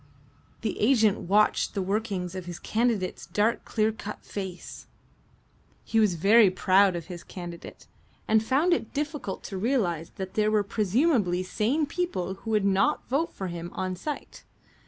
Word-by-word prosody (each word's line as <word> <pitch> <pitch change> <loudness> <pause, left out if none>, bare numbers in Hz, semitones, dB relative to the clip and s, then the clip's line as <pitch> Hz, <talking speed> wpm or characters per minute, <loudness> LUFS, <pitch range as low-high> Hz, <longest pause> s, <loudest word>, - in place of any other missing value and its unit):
The 220 -4 -3
agent 220 -3 +4
watched 210 +2 +3
the 195 - 0
workings 195 -3 -2
of 185 -2 -6
his 175 -1 -6
candidate's 220 -2 -1
dark 210 +6 +1
clear 220 0 +1
cut 210 -1 -8
face. 190 -3 -7 1.0
He 225 - +1
was 210 -5 +3
very 205 +5 +6
proud 190 0 +3
of 170 -2 -5
his 175 -1 -8
candidate, 175 -2 -9 0.4
and 220 0 +4
found 285 +10 +2
it 285 -6 -3
difficult 295 -8 -3
to 195 - -5
realize 190 - 0
that 190 -1 -6
there 215 0 +2
were 215 -1 +2
presumably 205 - +1
sane 230 +11 0
people 285 - -2
who 195 +4 -9
would 210 -2 +2
not 200 +10 +2
vote 305 +6 0
for 190 - -6
him 170 -1 -5
on 185 -1 -2
sight. 295 - -6
205 Hz, 155 wpm, -27 LUFS, 185-230 Hz, 1.0 s, very